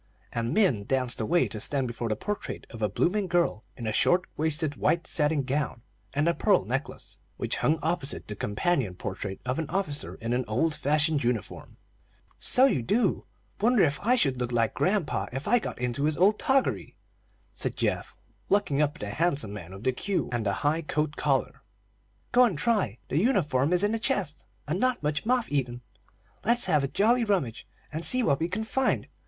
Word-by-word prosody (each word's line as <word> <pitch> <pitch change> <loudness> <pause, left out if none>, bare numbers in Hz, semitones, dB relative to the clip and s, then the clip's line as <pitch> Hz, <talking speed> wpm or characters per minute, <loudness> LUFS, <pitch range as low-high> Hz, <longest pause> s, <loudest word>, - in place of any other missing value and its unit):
And 115 0 -2
Min 155 - +2
danced 125 -2 0
away 170 +11 +2
to 110 - -5
stand 135 +4 +2
before 120 0 -4
the 110 - 0
portrait 205 - -5
of 115 - -9
a 105 - +1
blooming 190 - 0
girl 170 -11 +1
in 120 - -6
a 110 - -1
short 180 +10 +3
waisted, 155 -1 -1
white 170 0 +1
satin 150 -2 +1
gown 130 -3 -2 0.3
and 145 +3 +2
a 170 - +3
pearl 200 +2 +2
necklace, 135 +4 -5 0.2
which - - -1
hung 155 - +2
opposite 160 -3 -2
the 105 - -5
companion 105 - -1
portrait 95 +1 -5
of 130 +4 -1
an 160 - -3
officer 155 -7 -2
in 115 +1 -3
an 125 +1 +1
old 140 +9 +1
fashioned 150 0 +1
uniform. 120 -3 -3 0.6
"So 255 - +5
you 255 - +2
do. 205 - 0 0.3
Wonder 230 0 +4
if 145 -2 +1
I 245 +4 +4
should 135 - +2
look 125 -1 -2
like 115 -2 +1
grandpa 195 -4 0
if 135 +3 -5
I 245 +3 +4
got - - -6
into 125 +3 -1
his 155 -1 +1
old 205 +4 +4
toggery!" 270 -2 0 0.6
said - - -4
Geoff, - - -2 0.3
looking 150 -8 +2
up 145 -1 +1
at - - -13
the 105 - -4
handsome 145 - 0
man 95 -4 -8
with 95 +3 -10
the 130 - +2
queue 190 +9 -2
and 120 -2 -1
the 100 - +1
high 155 +3 +2
coat 150 -1 -2
collar. 135 -3 0 0.7
"Go 250 - +6
and 200 -10 -1
try; 200 - 0
the 145 - +1
uniform 160 - +2
is 180 +2 +4
in 205 - +2
the 225 - -1
chest, 200 - -1 0.2
and 165 +6 -1
not 255 -6 +1
much 150 +6 -1
moth 250 -5 +1
eaten. 125 -4 -1 0.6
Let's 240 +2 +3
have 155 -6 +2
a - - +1
jolly 230 - +3
rummage, 180 - -1 0.3
and 160 +2 -3
see 255 +6 +5
what 140 -10 +2
we 165 - 0
can 210 +4 -2
find. 265 +4 0
150 Hz, 195 wpm, -27 LUFS, 125-195 Hz, 0.7 s, Go